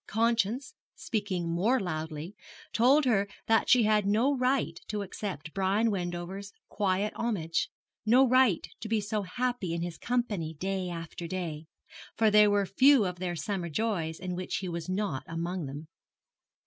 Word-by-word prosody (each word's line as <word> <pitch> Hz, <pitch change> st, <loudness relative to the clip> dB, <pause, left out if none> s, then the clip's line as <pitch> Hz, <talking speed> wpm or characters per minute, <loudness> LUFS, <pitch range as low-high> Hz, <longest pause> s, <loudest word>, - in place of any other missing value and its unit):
Conscience, 230 Hz, +3 st, +1 dB, 0.2 s
speaking 200 Hz, -6 st, -2 dB
more 220 Hz, +10 st, +2 dB
loudly, 160 Hz, -1 st, -4 dB, 0.4 s
told 270 Hz, +6 st, +5 dB
her 200 Hz, -5 st, +2 dB, 0.2 s
that 225 Hz, 0 st, +3 dB
she 250 Hz, -2 st, +6 dB
had 210 Hz, -2 st, +3 dB
no 235 Hz, +8 st, +3 dB
right 255 Hz, -10 st, 0 dB
to 210 Hz, -1 st, -2 dB
accept 185 Hz, -5 st, -6 dB
Brian 200 Hz, +4 st, +2 dB
Wendover's 185 Hz, +1 st, -4 dB, 0.2 s
quiet 200 Hz, 0 st, 0 dB
homage, 180 Hz, -9 st, -1 dB, 0.3 s
no 250 Hz, +5 st, +5 dB
right 255 Hz, -7 st, +4 dB
to 220 Hz, -, -6 dB
be 220 Hz, -1 st, +2 dB
so 210 Hz, +1 st, -2 dB
happy 205 Hz, -2 st, -2 dB
in 170 Hz, -, -2 dB
his 175 Hz, -1 st, -5 dB
company 210 Hz, -10 st, -1 dB
day 190 Hz, +2 st, -2 dB
after 170 Hz, 0 st, -6 dB
day; 165 Hz, -4 st, -4 dB, 0.5 s
for 220 Hz, -1 st, +3 dB
there 210 Hz, 0 st, +7 dB
were 205 Hz, -1 st, +2 dB
few 260 Hz, +4 st, +5 dB
of 180 Hz, -1 st, -4 dB
their 180 Hz, -1 st, -2 dB
summer 175 Hz, +2 st, -3 dB
joys 165 Hz, -3 st, -1 dB
in 185 Hz, -1 st, -4 dB
which 185 Hz, 0 st, -3 dB
he 190 Hz, -, -4 dB
was 170 Hz, -1 st, -5 dB
not 185 Hz, -8 st, -1 dB
among 170 Hz, 0 st, -3 dB
them. 145 Hz, +3 st, -7 dB
195 Hz, 160 wpm, -29 LUFS, 175-225 Hz, 0.5 s, there